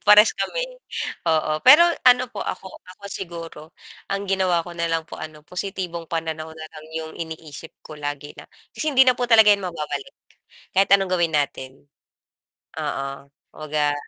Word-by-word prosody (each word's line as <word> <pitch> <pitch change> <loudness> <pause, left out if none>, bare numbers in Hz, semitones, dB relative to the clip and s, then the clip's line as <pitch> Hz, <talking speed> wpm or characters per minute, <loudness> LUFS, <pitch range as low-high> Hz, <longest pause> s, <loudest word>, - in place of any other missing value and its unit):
parehas 210 +1 +8
kami - - -2 0.6
oo. 155 -1 +2
Pero 295 +6 +9 0.3
ano 250 0 +5
po - - -6
ako 190 - -6 0.2
ako 200 - -18
siguro 165 -4 -7 0.4
ang 195 0 -2
ginawa 185 -3 +1
ko 175 - -9
na 170 -1 -2
lang 165 0 0
po - - -10
ano 155 -1 -9
positibong 180 -2 -5
pananaw 160 -1 -3
na 155 0 -8
lang 155 - -11
'yong 160 0 -5
iniisip 160 -1 -7 0.2
ko 155 - -10
lagi 145 0 -5
na - - -11 0.3
kasi 310 - -2
hindi 265 - +8
na 255 - +6
po 245 - 0
talaga 220 -2 +7
'yan 200 - +1
mababalik, 155 - -5 0.6
kahit 195 +1 +4
anong 195 -2 +4
gawin 170 -2 +1
natin. 135 -1 -4 0.9
Oo, 135 0 -4 0.3
kumbaga 150 -1 -1
165 Hz, 160 wpm, -23 LUFS, 155-195 Hz, 0.9 s, Pero